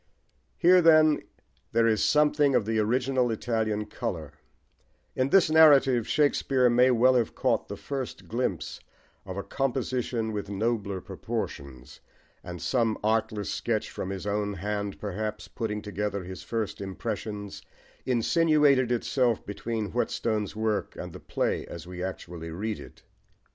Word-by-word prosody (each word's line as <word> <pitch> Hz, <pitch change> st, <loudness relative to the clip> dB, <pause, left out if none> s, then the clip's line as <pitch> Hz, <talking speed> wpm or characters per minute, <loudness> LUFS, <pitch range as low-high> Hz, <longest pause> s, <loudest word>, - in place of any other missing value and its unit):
Here, 180 Hz, +1 st, +6 dB
then, 155 Hz, -2 st, +5 dB, 0.5 s
there 115 Hz, -, +4 dB
is 110 Hz, -2 st, +2 dB
something 150 Hz, -2 st, +3 dB
of 105 Hz, -, +2 dB
the 110 Hz, 0 st, 0 dB
original 125 Hz, +3 st, +1 dB
Italian 110 Hz, -2 st, -1 dB
colour: 80 Hz, -7 st, -5 dB, 0.8 s
in 130 Hz, +1 st, +1 dB
this 195 Hz, +2 st, +5 dB
narrative 140 Hz, -7 st, +6 dB
Shakespeare 135 Hz, -4 st, +2 dB
may 125 Hz, +2 st, +5 dB
well 125 Hz, +1 st, +5 dB
have 120 Hz, -3 st, +1 dB
caught -, -, 0 dB
the -, -, -6 dB
first 135 Hz, -3 st, -5 dB
glimpse 120 Hz, +3 st, -2 dB, 0.5 s
of 95 Hz, 0 st, -6 dB
a 100 Hz, -, -3 dB
composition 125 Hz, -3 st, -2 dB
with 105 Hz, -2 st, -4 dB
nobler 100 Hz, -2 st, -1 dB
proportions; 65 Hz, -2 st, -6 dB, 0.4 s
and 90 Hz, 0 st, -7 dB
some 115 Hz, -1 st, +1 dB
artless 110 Hz, -1 st, 0 dB
sketch 110 Hz, -2 st, -2 dB
from 95 Hz, -, -5 dB
his 95 Hz, -1 st, -5 dB
own 105 Hz, 0 st, -1 dB
hand, 100 Hz, +2 st, -3 dB
perhaps, 105 Hz, +1 st, -4 dB
putting 105 Hz, -2 st, -4 dB
together 105 Hz, 0 st, -3 dB
his 95 Hz, +1 st, -8 dB
first 110 Hz, -3 st, -3 dB
impressions, 105 Hz, 0 st, -5 dB, 0.4 s
insinuated 140 Hz, 0 st, +3 dB
itself 120 Hz, 0 st, +1 dB
between 105 Hz, +1 st, -4 dB
Whetstone's 110 Hz, -4 st, -1 dB
work 110 Hz, -1 st, -1 dB
and -, -, -7 dB
the -, -, -9 dB
play -, -, -1 dB
as 85 Hz, 0 st, -8 dB
we 90 Hz, 0 st, -7 dB
actually 85 Hz, -3 st, -6 dB
read 105 Hz, +6 st, -4 dB
it. -, -, -13 dB
110 Hz, 140 wpm, -27 LUFS, 100-130 Hz, 0.8 s, Here